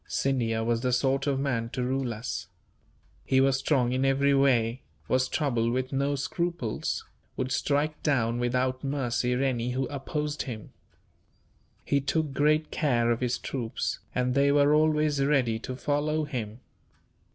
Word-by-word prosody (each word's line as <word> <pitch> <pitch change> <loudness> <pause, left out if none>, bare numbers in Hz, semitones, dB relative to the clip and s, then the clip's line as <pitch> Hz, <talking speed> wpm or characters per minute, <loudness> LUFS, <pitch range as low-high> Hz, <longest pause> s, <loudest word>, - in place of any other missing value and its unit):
"Scindia 115 -5 0
was 115 0 0
the 125 0 0
sort 135 +2 +1
of 135 -2 +1
man 125 -5 -1
to 125 +1 -3
rule 130 0 -1
us. 115 +2 -5 0.8
He 130 - +2
was 135 0 +3
strong 130 -4 +1
in 130 +1 0
every 135 +1 +3
way, 130 -3 +2 0.3
was 130 0 +2
troubled 120 -7 0
with 130 +1 -2
no 140 +1 +1
scruples, 170 - -2 0.3
would 130 0 -2
strike 150 +3 0
down 120 -5 +1
without 130 +2 0
mercy 125 -3 0
any 125 -2 0
who 130 +1 0
opposed 150 +1 -3
him. 115 -6 -7 1.1
He 140 -1 +2
took 150 +1 -1
great 155 +2 +2
care 120 -6 +1
of 115 - 0
his 125 0 0
troops, 120 -4 -3 0.2
and 125 0 +1
they 140 +1 +3
were 145 +1 +4
always 150 -2 +2
ready 130 -6 +2
to 130 +2 -6
follow 150 +3 0
him. 120 -5 -5
135 Hz, 150 wpm, -28 LUFS, 120-145 Hz, 1.1 s, were